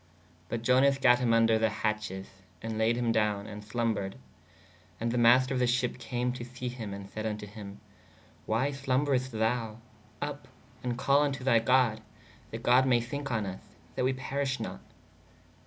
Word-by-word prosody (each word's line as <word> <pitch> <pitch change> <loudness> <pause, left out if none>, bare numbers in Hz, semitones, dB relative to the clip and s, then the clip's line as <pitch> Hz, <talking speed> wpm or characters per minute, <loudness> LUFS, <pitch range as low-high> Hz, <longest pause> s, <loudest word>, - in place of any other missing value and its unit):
But 115 -1 -3
Ionas 135 +2 +5
gatt 125 -2 +5
him 125 -1 +1
vnder 115 -1 +4
the 110 0 +3
hatches 105 -3 -2 0.2
& 90 -1 -27
layed 110 +1 +1
him 120 -1 0
downe 105 -2 +1
and 105 -1 -8
slombrede. 105 -3 -2 0.8
And 115 +1 -1
[the] 125 - -1
master 125 +3 +5
of 130 - 0
the 125 - +3
sheppe 125 +1 0
came 125 0 -2
to 125 - -6
him 125 -3 -6 0.2
& - - -22
sayd 110 - -4
vn 110 -1 -2
to 105 - -8
hī/ 100 -1 -9 0.7
why 120 +6 +1
slomberest 135 -1 0
thou? 110 -1 -1 0.4
vpp! 145 0 -3 0.3
& 125 -1 -4
call 140 +2 +3
vn 145 -2 +1
to 135 -1 -7
thy 120 -3 +4
god/ 115 -2 +3 0.5
that 115 +1 -7
God 125 +2 +5
maye 120 -2 +4
thinke 135 +4 -5
on 110 -3 0
vs/ 95 -1 -5 0.3
that - - -1
we 130 +1 +2
perish 130 0 -2
not. - - -5
120 Hz, 180 wpm, -29 LUFS, 110-130 Hz, 0.8 s, Ionas